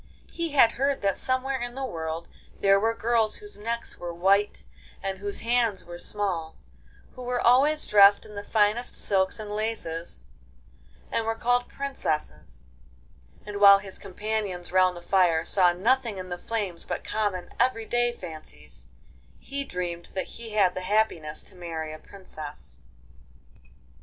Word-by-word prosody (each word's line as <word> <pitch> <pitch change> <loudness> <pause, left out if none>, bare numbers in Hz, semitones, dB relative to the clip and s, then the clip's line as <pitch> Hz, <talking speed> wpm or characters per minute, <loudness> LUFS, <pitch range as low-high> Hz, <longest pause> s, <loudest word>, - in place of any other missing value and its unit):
He 335 -1 -2
had 235 -5 +6
heard 275 +1 0
that 195 -1 +2
somewhere 260 0 -1
in 240 0 -4
the 270 0 -3
world 165 -5 -4 0.3
there 195 0 +5
were 225 +2 +1
girls 225 -2 +1
whose 415 -1 -7
necks 230 +3 -3
were 175 -1 -4
white 195 +4 +2 0.4
and 195 -1 -3
whose 200 0 -1
hands 230 -4 +1
were 175 0 -9
small, 175 -6 -1 0.6
who 255 - -10
were 245 0 -1
always 275 +6 +4
dressed 200 -1 +6
in 210 - -12
the 205 0 -6
finest 220 +3 +1
silks 190 0 +1
and 215 -2 -7
laces, 210 -6 -3 0.9
and 230 - 0
were 225 0 -1
called 245 +2 +1
princesses, 155 - -4 0.8
and 205 -1 -5
while 200 -1 +9
his 195 -1 -7
companions 200 -2 -4
round 185 -1 +3
the - - -9
fire 175 -4 +3
saw 180 -2 +5
nothing 230 +4 +1
in 185 0 -6
the 175 - -4
flames 200 -7 -3
but - - -4
common 200 -5 -2
everyday 240 0 +1
fancies, 155 - -9 0.5
he 280 0 -4
dreamed 175 -6 -4
that 190 - -1
he 230 -1 -9
had 195 -4 +4
the 185 - -4
happiness 185 -6 0
to - - -12
marry 165 -3 -5
a 155 - -9
princess. 155 -5 -10
205 Hz, 150 wpm, -27 LUFS, 175-235 Hz, 0.9 s, while